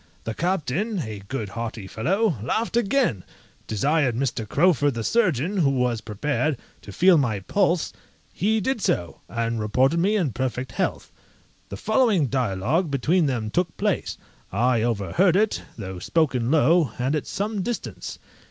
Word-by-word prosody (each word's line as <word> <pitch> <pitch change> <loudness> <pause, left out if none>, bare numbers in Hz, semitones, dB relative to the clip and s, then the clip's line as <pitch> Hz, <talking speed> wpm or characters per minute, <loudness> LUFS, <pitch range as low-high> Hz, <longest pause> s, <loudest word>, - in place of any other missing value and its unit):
The 110 - -3
captain 180 - -1
(a 105 -2 -7
good, 115 -5 -4
hearty 115 -2 -5
fellow) 170 - 0
laughed 220 - -1
again, 235 - +1 0.4
desired 135 +3 +1
Mr. 120 -4 -2
Crowford 145 -4 +3
the 115 - -3
surgeon, 185 - +1
who 155 -7 +3
was 125 -4 0
prepared, 140 +7 -1 0.2
to 100 - -10
feel 175 - +5
my 110 -8 0
pulse; 180 - +1 0.4
he 220 +4 +1
did 265 +2 -1
so, 85 - -1
and 115 -1 -2
reported 130 +9 +2
me 200 +5 +2
in 175 -10 +1
perfect 130 +1 -3
health. - - -2 0.6
The 100 - -6
following 215 - +2
dialogue 130 - 0
between 150 +5 +2
them 115 -5 -2
took 175 +2 -1
place; - - -1 0.3
I 120 -1 +2
overheard 120 - +2
it, 210 +2 +2 0.2
though 95 -4 -6
spoken 130 - +1
low, 155 -2 +3
and 130 +4 0
at 150 - -3
some 205 0 -2
distance. 240 +4 -5
140 Hz, 150 wpm, -24 LUFS, 115-185 Hz, 0.6 s, feel